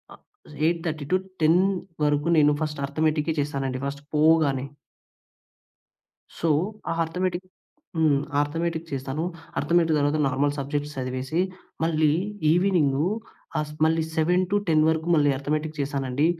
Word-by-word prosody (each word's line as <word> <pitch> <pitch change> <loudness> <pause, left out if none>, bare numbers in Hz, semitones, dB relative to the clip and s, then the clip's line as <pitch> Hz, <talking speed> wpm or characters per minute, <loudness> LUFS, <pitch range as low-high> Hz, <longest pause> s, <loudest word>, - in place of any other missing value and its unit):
ఆహ్, - - -28 0.4
8:30-10 170 +1 0 0.5
వరకు 145 +1 +1
నేను 150 0 +5
ఫస్ట్ 150 -2 -4
అర్ధమెటిక్కే 155 +2 0
చేస్తానండి. 135 -2 -3
ఫస్ట్ 140 +1 -6
పోగానే. 150 -4 +3 1.7
సో, 165 - +1 0.4
ఆ - - +1
అర్ధమెటిక్ 180 +2 -2 0.5
హ్మ్. 150 -3 +3 0.2
అర్ధమెటిక్ 165 +2 -2
చేస్తాను. 135 +3 -3 0.4
అర్థమెటిక్ 165 -2 +2
తర్వాత 145 +2 +1
నార్మల్ 140 +2 +1
సబ్జెక్ట్స్ 145 +1 -3
చదివేసి 130 +4 -2 0.4
మళ్ళీ 155 -2 +3 0.4
ఈవెనింగు 165 -5 +2 0.5
ఆహ్, 150 0 -1 0.2
మళ్ళీ 160 0 +2
7-10 180 0 +2
వరకు 160 +1 -1
మళ్ళీ 145 -2 +4
అర్ధమెటిక్ 155 +2 -2
చేశానండి. 140 0 0
155 Hz, 105 wpm, -25 LUFS, 145-165 Hz, 1.7 s, నేను